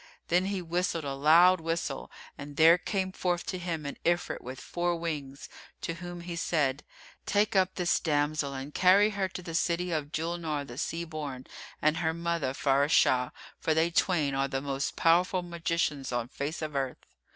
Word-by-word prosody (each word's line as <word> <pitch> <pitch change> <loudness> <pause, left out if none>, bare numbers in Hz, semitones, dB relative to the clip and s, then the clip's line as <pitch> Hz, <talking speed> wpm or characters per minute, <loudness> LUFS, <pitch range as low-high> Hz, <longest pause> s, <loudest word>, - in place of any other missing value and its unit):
Then 180 +2 +3
he 195 -2 -2
whistled 170 -1 -1
a 140 -1 -3
loud 165 +6 +6
whistle 165 +1 -3 0.3
and 145 0 -9
there 165 +2 +7
came 190 0 -2
forth 180 -2 -1
to 185 - -3
him 165 -4 -4
an 140 - -5
Ifrit 175 +1 0
with 130 +1 -8
four 175 0 -1
wings, 150 -5 -5 0.3
to 165 - -3
whom 175 -1 -6
he 170 0 -6
said, 150 -5 0 0.4
"Take 210 +1 +2
up 185 -1 +3
this 175 -1 +1
damsel 150 -2 0
and 135 +2 -6
carry 195 +4 +5
her 195 -2 -1
to 185 -1 -7
the 165 - -7
city 175 +1 0
of 150 -3 -2
Julnar 160 -3 -2
the 120 -1 -8
Sea 165 +1 -2
born 145 -5 -6 0.4
and 155 +1 +3
her 160 -1 0
mother 170 -5 -1
Faráshah[FN#346] 135 -2 +3 0.3
for 160 - +1
they 165 +2 +2
twain 165 -5 +2
are 135 0 +1
the 135 -1 -2
most 140 0 -3
powerful 180 +3 +3
magicians 165 -5 -2
on 120 -1 -2
face 150 +4 -4
of 150 -2 -5
earth." 135 -2 -3
165 Hz, 180 wpm, -29 LUFS, 145-175 Hz, 0.4 s, there